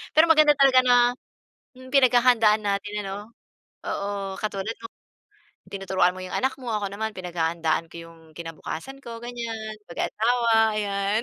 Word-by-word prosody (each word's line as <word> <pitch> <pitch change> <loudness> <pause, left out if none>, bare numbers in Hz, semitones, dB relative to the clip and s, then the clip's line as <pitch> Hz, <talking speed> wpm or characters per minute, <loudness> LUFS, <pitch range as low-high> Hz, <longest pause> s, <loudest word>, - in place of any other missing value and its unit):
Pero 315 +2 +7
maganda 305 -2 +6
talaga 270 -2 +6
na, 250 -1 +4 0.8
hmm, 255 0 -13
pinaghahandaan 245 -5 +4
natin 205 0 -2
ano, 205 +3 -7 0.5
oo, 200 -1 -3
katulad 210 +1 -3
mo 230 - -7 0.8
tinuturuan 190 -2 +1
mo - - -8
'yong 185 - -8
anak 265 +1 0
mo 240 - -4
ako, 205 -1 -2
naman 220 +2 -3
pinaghahandaan 165 -2 -2
ko - - -12
'yong 165 0 -16 0.2
kinabukasan 170 +10 -7
ko, 230 -1 -7
ganyan, 230 -3 -6
pag-aasawa, 225 +3 +1
ayan. 200 +1 -1
215 Hz, 140 wpm, -25 LUFS, 195-240 Hz, 0.8 s, Pero